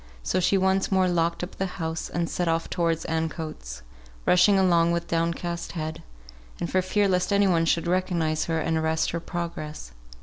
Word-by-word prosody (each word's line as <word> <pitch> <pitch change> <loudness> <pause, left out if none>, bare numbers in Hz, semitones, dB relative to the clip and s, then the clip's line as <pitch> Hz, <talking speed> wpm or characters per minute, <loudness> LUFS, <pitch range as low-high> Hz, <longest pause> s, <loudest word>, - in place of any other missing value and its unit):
So 185 - 0
she 190 +2 +3
once 190 +1 +1
more 190 -1 +3
locked 170 -1 0
up 180 - -7
the 195 - -1
house, 160 -2 -3
and 170 -1 -1
set 175 +2 -2
off 165 0 0
towards 165 -1 0
Ancoats; 155 - -4 0.4
rushing 180 +3 +5
along 170 -3 +3
with 170 0 -2
down 165 0 +1
cast 170 0 -5
head, 160 -1 -4 0.7
for 185 +2 +1
fear 200 +2 +1
lest 180 +1 +1
any 200 0 +4
one 170 -3 +3
should 165 0 +1
recognise 170 -3 0
her 165 -1 -1
and 160 +1 0
arrest 160 0 0
her 170 - -2
progress. 165 - -6
170 Hz, 180 wpm, -26 LUFS, 160-180 Hz, 0.7 s, rushing